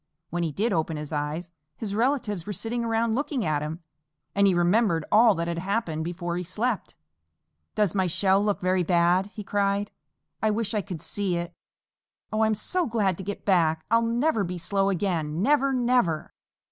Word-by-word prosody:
When 175 +1 -1
he 165 -2 -1
did 210 +8 0
open 160 -2 -1
his 150 +1 -6
eyes, 150 +4 -3 0.2
his 210 -3 -4
relatives 220 - 0
were 205 - -3
sitting 230 +5 -2
around 225 0 +1
looking 270 - -1
at 150 -2 0
him, 160 +3 -5 0.5
and 200 0 +4
he 190 - +4
remembered 175 -1 +2
all 220 -1 +6
that 170 0 -2
had 170 0 -2
happened 185 -4 -2
before 175 0 -3
he 180 - -2
slept. 215 +6 -2 0.8
"Does 210 -5 +2
my 190 -2 +1
shell 190 +3 +3
look 205 -1 0
very 185 0 +2
bad?" 175 +2 +3
he 210 0 -8
cried. 200 0 0 0.5
"I 220 - +2
wish 215 0 -1
I 210 - +1
could 180 -5 -7
see 195 -4 -1
it. 170 0 -4 0.8
Oh, 215 - 0
I 220 - +4
am 220 - +1
so 360 - 0
glad 210 -6 +1
to - - -5
get 200 +2 -6
back! 160 -5 +2
I'll 230 0 +5
never 230 0 +1
be 180 0 -4
slow 195 +3 +1
again, 170 -4 -1
Never! 275 0 +3
Never!" 245 -11 +1
195 Hz, 190 wpm, -26 LUFS, 170-220 Hz, 0.8 s, all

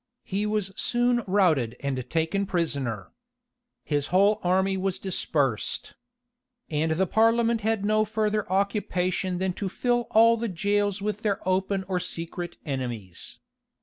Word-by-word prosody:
He 205 +2 -1
was 210 -2 -1
soon 240 +1 +1
routed 160 - +2
and 130 -3 -3
taken 165 +5 0
prisoner. 140 - -2 0.7
His 145 -1 -1
whole 200 +3 +4
army 190 +2 +2
was 190 0 -1
dispersed. 145 - -1 0.8
And 160 +1 +1
the 185 +4 +2
parliament 230 +3 +3
had 220 -1 0
no 215 +1 +3
further 215 -2 -1
occupation 190 -2 0
than 185 0 -1
to 195 +1 -3
fill 240 +4 0
all 230 +1 +6
the 230 0 -2
jails 205 +2 0
with 210 0 -2
their 205 -3 0
open 190 +1 +1
or 185 -2 0
secret 175 0 -5
enemies. 120 - -5
190 Hz, 135 wpm, -26 LUFS, 165-210 Hz, 0.8 s, all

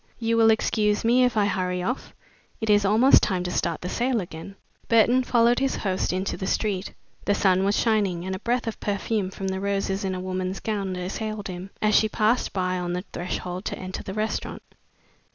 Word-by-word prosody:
You 230 -1 0
will 225 -1 +5
excuse 210 -1 +2
me 245 +2 +5
if 245 -2 0
I 205 - +4
hurry 180 -2 -1
off? 250 +8 -4 0.4
It 220 -1 +1
is 205 -1 +4
almost 225 +7 +6
time 185 -2 0
to 180 - -3
start 170 -2 -1
the 180 - -4
sale 245 +4 0
again." 175 +1 -8 0.3
Burton 235 +3 +4
followed 240 0 +3
his 270 0 0
host 190 -2 -1
into 185 +2 -2
the 190 - -4
street. 200 -2 -1 0.3
The 205 - +2
sun 190 -1 +3
was 200 +1 +2
shining, 200 -6 +1
and 190 0 -2
a - - -6
breath 240 +3 -1
of 225 - -4
perfume 205 -1 -1
from 190 0 -4
the 190 0 -2
roses 195 0 -1
in 190 -1 -1
a - - -4
woman's 185 +1 -3
gown 200 -4 -2
assailed 205 +3 -4
him, 180 +1 -7
as 215 0 +3
she 220 - +4
passed 220 +4 +1
by 185 -1 -1
on 175 0 -3
the 180 +1 -3
threshold 180 +1 -4
to - - -3
enter 185 0 -6
the 190 - -7
restaurant. 215 +1 -3
200 Hz, 205 wpm, -25 LUFS, 185-220 Hz, 0.4 s, almost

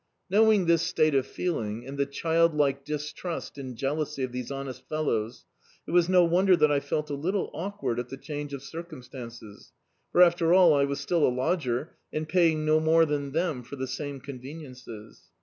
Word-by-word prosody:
Knowing 215 -2 +5
this 170 -1 +4
state 160 -2 +2
of 135 -1 +2
feeling, 115 -10 -3
and 135 +1 -7
the 140 0 0
child 165 +3 +1
like 140 -2 +1
distrust 150 +2 -5
and 130 -2 -6
jealousy 145 +2 -2
of 130 - -3
these 125 -1 -5
honest 135 -2 -6
fel 155 0 -1
lows, 115 -3 -2 0.4
it - - -7
was 175 0 +4
no 180 -1 +6
wonder 180 +2 +4
that 150 -3 +4
I 145 - +3
felt 150 +1 -3
a - - -1
little 180 +8 -2
awkward 195 - -3
at 125 0 -5
the 135 - -7
change 145 0 -6
of 140 -1 -6
circumstances; 125 - -10 0.4
for, 180 - +7
after 170 0 +4
all, 180 -4 +7
I 140 -1 +3
was 140 0 -3
still 160 +3 0
a - - +5
lodger, 130 +1 -1
and 155 0 -3
paying 160 -3 +2
no 155 0 +4
more 160 +1 +4
than 145 -2 -2
them 160 -4 -1
for 125 +4 -9
die 130 -1 -3
same 140 +2 -5
conveniences. 130 -4 -10
150 Hz, 195 wpm, -27 LUFS, 130-165 Hz, 0.4 s, for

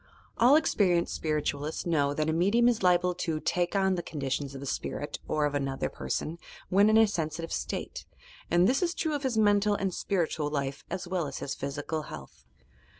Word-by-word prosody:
All 245 +5 +7
experienced 185 - +2
spirit 155 -2 -1
ualists 145 +2 -4
know 145 -5 +2
that 155 0 0
a 160 - +1
medium 200 +8 +3
is 240 -2 +2
liable 180 -1 +3
to 165 -3 -2
"take 175 +4 -1
on" 190 -1 +3
the 175 - -1
conditions 140 -3 -3
of 135 - -7
a - - -6
spirit - - -4
or 150 -1 +1
of 145 - -1
another 135 -2 -1
person, 165 +2 -4 0.3
when 200 +3 +5
in 220 - +5
a 225 - +7
sensitive 165 -4 -3
state, - - -4 0.4
and 175 +2 +4
this 260 - +2
is 350 -1 0
true 315 -2 -1
of 290 - -2
his 260 -5 -1
mental 205 -1 +4
and 195 -2 -1
spiritual 165 -6 -1
life 140 -2 -3
as 180 - -4
well 175 -4 -1
as 140 - -6
his 140 - -4
physical 145 +3 -4
health. 75 - -11
170 Hz, 200 wpm, -29 LUFS, 150-200 Hz, 0.4 s, All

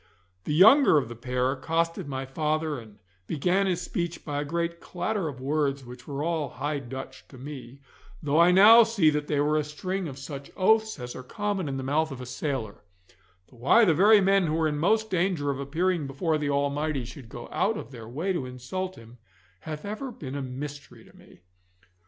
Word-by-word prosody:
The 150 - -1
younger 220 - +7
of 140 - 0
the 120 - -7
pair 125 +2 -1
accosted 165 +5 -1
my 135 -1 -4
father 155 +1 -1
and 110 -3 -14 0.3
began 180 +6 +1
his 180 -1 -1
speech 170 -1 -4
by 145 -1 -2
a - - -2
great 170 +2 -2
clatter 180 +1 -3
of 135 -4 -6
words 140 0 -1
which 125 +1 -12
were 140 0 -3
all 160 -4 -1
High 145 +2 -3
Dutch 130 0 -9
to 130 - -14
me, 135 -1 -9 0.4
though 150 +2 +2
I 170 +1 +7
now 210 +6 +9
see 215 -9 +3
that 150 0 -2
they 145 - 0
were 150 +1 +2
a 155 - +1
string 185 +5 -4
of 135 -3 -8
such 140 0 -8
oaths 220 +2 +3
as 125 0 -7
are - - -6
common 200 - -3
in 135 - -3
the 135 - -4
mouth 155 +4 +1
of 135 - -7
a 125 - -6
sailor; 125 -4 -4 0.7
though 125 - -18
why 140 - +5
the 170 - +4
very 205 +6 +6
men 195 -2 +3
who 160 +1 0
are 160 - +3
in 150 -1 -2
most 220 +6 +2
danger 175 -5 +1
of 135 - -5
appearing 160 +3 -1
before 155 +3 -1
the 145 -1 -1
Almighty 140 -1 -1
should 125 0 -11
go 120 +1 -8
out 205 +3 +1
of - - -8
their 115 -4 -10
way 165 +10 -2
to 140 -8 -3
insult 180 +10 -5
Him, 115 +1 -15 0.4
hath 155 - -7
ever 215 +6 -5
been 135 - -8
a 140 - -3
mystery 140 +2 -7
to - - -20
me. - - -19
150 Hz, 210 wpm, -27 LUFS, 135-180 Hz, 0.7 s, now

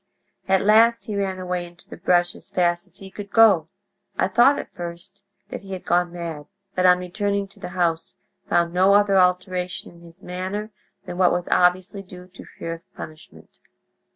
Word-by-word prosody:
At 190 0 +3
last 230 +2 +5
he 210 - -4
ran 195 -2 -1
away 180 -1 -3
into 175 0 -15
the - - -9
brush 175 -1 +2
as - - -12
fast 175 0 0
as 185 0 -14
he 195 -1 -11
could 200 +1 -8
go. 200 -8 +5 0.5
I 185 - +1
thought 240 +8 +5
at - - -7
first 175 +3 -8 0.3
that - - -6
he 195 -1 -8
had 185 - -7
gone 175 0 +1
mad, 165 -4 -6 0.3
but 185 0 +3
on 180 0 +6
returning 200 +2 -2
to - - -21
the - - -6
house 165 -2 0 0.3
found 170 0 +2
no 190 +2 +5
other 205 -1 +4
alteration 180 0 0
in 170 -1 -18
his 170 +2 -17
manner 190 +4 -5 0.3
than 175 - -7
what 180 -2 +5
was 175 0 -1
obviously 180 +2 +2
due 180 -1 -12
to 185 - -13
fear 165 - -4
of 165 +2 -13
punishment. 120 - -12
180 Hz, 190 wpm, -23 LUFS, 175-195 Hz, 0.5 s, on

